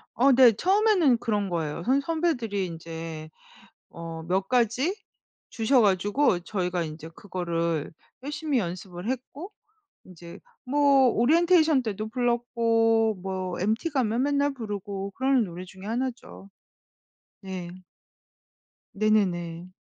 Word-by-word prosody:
어 270 +3 +4
네. 250 -2 +7
처음에는 370 - +3
그런 205 -3 -1
거예요. 165 -1 -3
선 270 +4 +2
선배들이 270 - -1
인제 165 -2 -7 0.6
어 165 -1 -8
몇 185 +3 -1
가지 255 - +1 0.5
주셔 240 +2 +2
가지고 205 +2 +2
저희가 180 -1 -2
인제 155 +1 -8
그거를 170 -5 -3 0.3
열심히 295 -1 -2
연습을 180 +2 -5
했고 275 - -6 0.5
인제 170 -2 -12 0.3
뭐 275 -1 +4
오리엔테이션 315 +2 +3
때도 215 0 -4
불렀고 230 -3 +1
뭐 185 -2 -4
MT 220 - 0
가면 250 -2 0
맨날 285 0 +1
부르고 200 -4 -5
그러는 260 +1 +2
노래 180 +1 -8
중에 190 +1 -13
1 245 +4 -1
죠. 200 -4 -14 0.9
네. 185 -2 -6 1.2
네네네. 185 -5 0
215 Hz, 240 characters per minute, -26 LUFS, 180-260 Hz, 1.2 s, 네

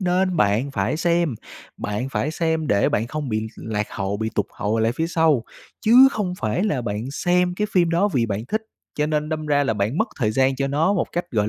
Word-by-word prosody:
nên 185 0 +1
bạn 110 +2 +2
phải 145 - -1
xem. 170 -4 +1 0.4
Bạn 105 +5 -3
phải 140 +2 -1
xem 160 -1 -1
để 100 -6 +2
bạn 110 - 0
không 150 +2 -4
bị 110 -1 -2
lạc 105 -1 -3
hậu, 100 0 -3
bị 110 +1 -2
tụt 105 - 0
hậu 105 +2 -1
lại 110 +1 +2
phía 160 +6 -1
sau, 160 -7 +2 0.4
chứ 250 +5 +7
không 195 -8 -2
phải 115 - 0
là 150 - 0
bạn 110 +3 -4
xem 180 +3 +1
cái 210 +3 -1
phim 175 -3 +3
đó 175 +5 +2
vì 125 - 0
bạn 105 +1 -3
thích. 220 0 -1 0.3
Cho 150 - 0
nên 150 0 -1
đâm 155 -1 -3
ra 145 -1 +2
là 110 - 0
bạn 105 - -1
mất 220 - +1
thời 110 -6 +1
gian 130 +3 +2
cho 135 +1 0
nó 155 +7 +2
một 185 - 0
cách, 175 - -1
gọi 105 -2 +1
145 Hz, 235 wpm, -22 LUFS, 110-175 Hz, 0.4 s, chứ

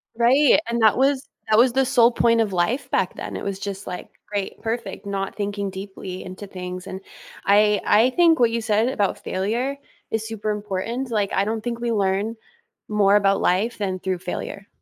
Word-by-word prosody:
Right, 265 +6 +5
and 235 0 -1
that 220 - +5
was 270 0 +2 0.2
that 215 - +4
was 240 +1 +5
the 265 0 +3
sole 245 -2 +5
point 230 -1 +3
of 210 -4 +1
life 200 +10 0
back - - 0
then, - - -6
it - - -5
was 195 -1 -3
just, 200 0 -5
like, 180 -1 -6 0.2
"Great, 200 -2 -3
perfect," 225 -3 -4
not 195 -1 -3
thinking 200 -1 -3
deeply 190 -1 -7
into 185 +2 -9
things. 180 -1 -7
And 190 +1 -6 0.4
I 210 +1 +4
I 230 +5 +4
think 330 0 +4
what 235 -1 +4
you 230 0 -1
said 220 +1 +2
about 205 -6 -1
failure 235 +9 -1 0.3
is 220 0 -1
super 215 -1 -3
important, 210 +5 -3
like, 205 -3 0
I 195 - +2
don't 220 0 -2
think 235 -1 -3
we 235 -1 -1
learn 200 +2 0 0.5
more 205 -1 +3
about 195 -1 +2
life 200 +7 +1
than 190 -2 -2
through 185 -1 -2
failure. 195 +2 -6
210 Hz, 195 wpm, -23 LUFS, 195-235 Hz, 0.5 s, Right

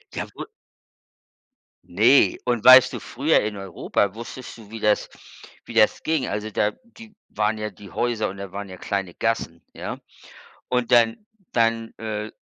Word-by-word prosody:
Ja - - -3
wo - - -6 1.4
Ne, 115 +10 +4
und 120 -3 0
weißt 130 +1 +9
du, - - -4
früher 145 +6 +1
in 105 -1 -4
Europa 95 +1 -2
wusstest 120 +2 -9
du, 110 -3 -14
wie 115 - -7
das 105 0 +1 0.6
wie - - -9
das - - +3
ging. 155 -5 0
Also 105 +1 -3
da, 105 0 +1
die 230 -2 -15 0.2
waren 105 +1 0
ja 105 0 -4
die 100 0 -14
Häuser 120 -4 -1
und 95 - -9
da 100 -2 -7
waren 100 0 -6
ja 95 - -9
kleine 95 -1 -3
Gassen, 100 -7 -2
ja, - - -6 0.7
und 125 -1 0
dann 120 - +3 0.3
dann, 115 -1 +1
äh, 110 -1 -4
110 Hz, 165 wpm, -23 LUFS, 100-120 Hz, 1.4 s, weißt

